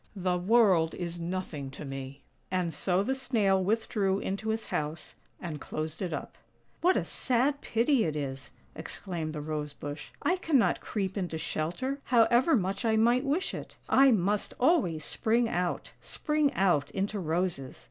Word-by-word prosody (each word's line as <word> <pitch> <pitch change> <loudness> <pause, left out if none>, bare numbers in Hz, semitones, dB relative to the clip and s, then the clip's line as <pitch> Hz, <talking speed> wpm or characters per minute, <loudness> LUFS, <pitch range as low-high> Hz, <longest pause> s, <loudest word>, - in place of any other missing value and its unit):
The 185 -2 0
world 185 -5 +4
is 175 -1 -4
nothing 170 -5 -4
to 150 - -7
me." 135 0 -7 0.3
And 180 -3 -1
so 180 +5 +1
the 265 - 0
Snail 220 -8 +1
withdrew 205 -1 +1
into 200 +2 -3
his 220 0 -1
house, 150 +2 -3 0.3
and 155 -5 -6
closed 155 +2 -4
it 180 -3 -2
up. - - -6 0.4
"What 365 +2 +4
a - - 0
sad 270 +3 0
pity 235 +2 +2
it 155 -2 -2
is!" 135 -3 -4 0.3
exclaimed 170 -5 -5
the 150 -1 -5
Rose 150 -1 -4
bush. 145 +1 -7
"I 360 - +2
cannot 305 -9 +2
creep 195 -2 -2
into 175 -4 -3
shelter, 175 - -2
however 240 +5 +4
much 195 0 -1
I 225 -1 +2
might 240 +4 +3
wish 310 +7 0
it. - - -7
I 270 0 +6
must 205 -2 +1
always 245 - +2
spring 230 +2 +1
out, 180 -4 -2
spring 300 -2 0
out 175 -7 +2
into 200 +2 -2
roses. 165 -5 -2
190 Hz, 160 wpm, -29 LUFS, 160-235 Hz, 0.4 s, I